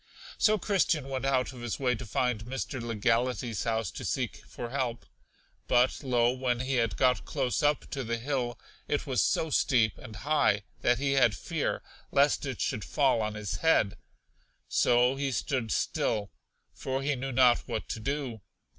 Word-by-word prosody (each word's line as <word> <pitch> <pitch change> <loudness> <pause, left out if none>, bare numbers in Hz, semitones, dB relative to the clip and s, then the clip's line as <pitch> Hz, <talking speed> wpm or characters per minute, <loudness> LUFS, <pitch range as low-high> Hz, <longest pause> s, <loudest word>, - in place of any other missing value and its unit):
So 215 0 +4
Christian 170 -8 +1
went 135 0 -3
out 130 -1 +1
of 125 - -10
his 120 -2 -3
way 125 -2 +2
to 125 0 -6
find 115 0 0
Mr. 130 +1 -4
Legality's 115 0 0
house 115 -1 -1
to - - -7
seek - - -2
for 120 -1 -7
help. 125 -3 -2 0.6
But, 125 0 +3
lo, 120 -2 +3
when 125 -1 -1
he 130 0 -1
had 115 -2 0
got 125 -1 +3
close 125 - -1
up 145 -1 +1
to 135 -2 -3
the 115 0 -2
hill, 120 -1 -2 0.3
it 145 - -1
was 130 -3 +1
so 160 - +1
steep 115 -7 +2
and 110 - -10
high 120 -6 +2 0.2
that 120 - +2
he 140 +2 0
had 125 -6 +4
fear - - -2 0.3
lest 140 0 +3
it 130 -4 -4
should 105 - -1
fall 135 -5 +2
on 105 0 -2
his 105 -1 -3
head; 160 -11 +3 0.7
so 125 +2 +3
he 135 -1 -1
stood 120 -1 -1
still, 105 -3 0 0.4
for 135 +1 -3
he 145 0 +1
knew 135 +1 -4
not 125 -1 +5
what 115 -3 -3
to - - -3
do. 130 -2 -3
125 Hz, 175 wpm, -29 LUFS, 115-135 Hz, 0.7 s, not